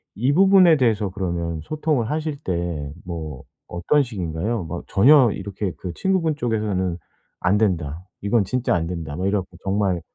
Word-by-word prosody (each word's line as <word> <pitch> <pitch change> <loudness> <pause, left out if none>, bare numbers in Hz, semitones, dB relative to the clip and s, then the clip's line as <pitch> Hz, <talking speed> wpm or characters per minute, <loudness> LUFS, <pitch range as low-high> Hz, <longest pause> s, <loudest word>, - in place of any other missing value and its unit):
이 125 +6 +1
부분에 185 -2 +6
대해서 110 -6 +1
그러면 85 -3 -3
소통을 150 - -1
하실 155 -1 -2
때 85 - -3
뭐 80 -6 -6 0.2
어떤 90 +12 +1
식인가요? 100 -1 -3
뭐 85 +2 -6
전혀 125 +2 +6
이렇게 100 -1 -4
그 90 - -5
친구분 180 -5 +1
쪽에서는 105 -7 -1 0.4
'안 100 +3 +3
된다. 90 -5 -1 0.2
이건 100 +1 +2
진짜 125 +3 0
안 80 -1 -1
된다.' 80 -4 -5
뭐 95 - -1
이래 100 +1 +2
갖고 90 -2 -6
정말 95 -3 0
100 Hz, 320 characters per minute, -22 LUFS, 85-125 Hz, 0.4 s, 부분에